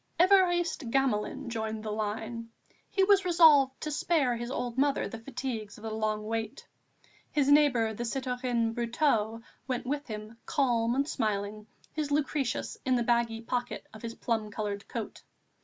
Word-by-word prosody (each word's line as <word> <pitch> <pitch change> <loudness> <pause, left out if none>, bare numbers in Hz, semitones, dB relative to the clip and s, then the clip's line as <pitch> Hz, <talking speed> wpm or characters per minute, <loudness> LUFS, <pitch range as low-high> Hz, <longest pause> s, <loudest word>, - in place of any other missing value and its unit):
Évariste 350 -7 +4
Gamelin 265 +1 0
joined 220 -2 -3
the 215 - -3
line; 220 +2 -3 0.4
he 385 - +2
was 395 0 +5
resolved 315 -7 +6
to 305 - -3
spare 290 -5 +1
his 235 +1 -5
old 245 -2 -3
mother 280 +1 +2
the 225 - -7
fatigues 230 -4 -5
of 215 - -14
the 220 - -4
long 215 -1 -1
wait. 225 0 -4 0.6
His 285 -2 +2
neighbour, 255 -7 +4
the 235 - -4
citoyen 250 -2 -1
Brotteaux, 230 -2 0 0.2
went 255 -2 -2
with 285 +3 -2
him, 215 0 -7
calm 240 -5 +2
and 280 +2 +1
smiling, 210 -4 -2 0.3
his 305 -2 -2
Lucretius 275 - -1
in 260 -1 +2
the 240 - +1
baggy 235 -1 +1
pocket 245 +1 -3
of 220 - -11
his 230 -1 -6
plum 220 -3 -1
coloured 205 -1 -4
coat. - - -6
240 Hz, 155 wpm, -30 LUFS, 220-280 Hz, 0.6 s, resolved